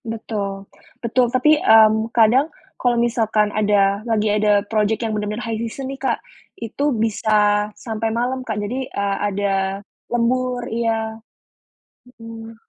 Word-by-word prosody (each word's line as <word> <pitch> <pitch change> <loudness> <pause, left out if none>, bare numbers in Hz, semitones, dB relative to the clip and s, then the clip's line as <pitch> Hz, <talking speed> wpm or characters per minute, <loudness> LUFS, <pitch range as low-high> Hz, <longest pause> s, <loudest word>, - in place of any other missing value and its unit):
Betul. 205 -3 -4 0.4
Betul 245 +1 +1
tapi, 255 +5 +3
mmm, 220 0 +5
kadang 240 +7 +4 0.3
kalau 245 -1 +2
misalkan 220 -3 +1
ada 200 -1 +2
lagi 215 -2 +1
ada 210 -1 +2
project 215 +2 0
yang 220 - -2
bener-bener 210 +2 -3
high 225 -1 -2
season 235 +4 -5
nih 270 - -11
Kak, 270 - 0 0.4
itu 285 - -2
bisa 210 -1 +2
sampai 225 -1 -3
malam 245 +3 -1
Kak 220 -4 -4
jadi, 245 +6 -3
eee, 200 0 -2
ada 200 0 -1 0.6
lembur 245 +1 0
iya. 225 -1 -2 1.0
Hmm. 225 0 -9
225 Hz, 130 wpm, -20 LUFS, 210-235 Hz, 1.0 s, mmm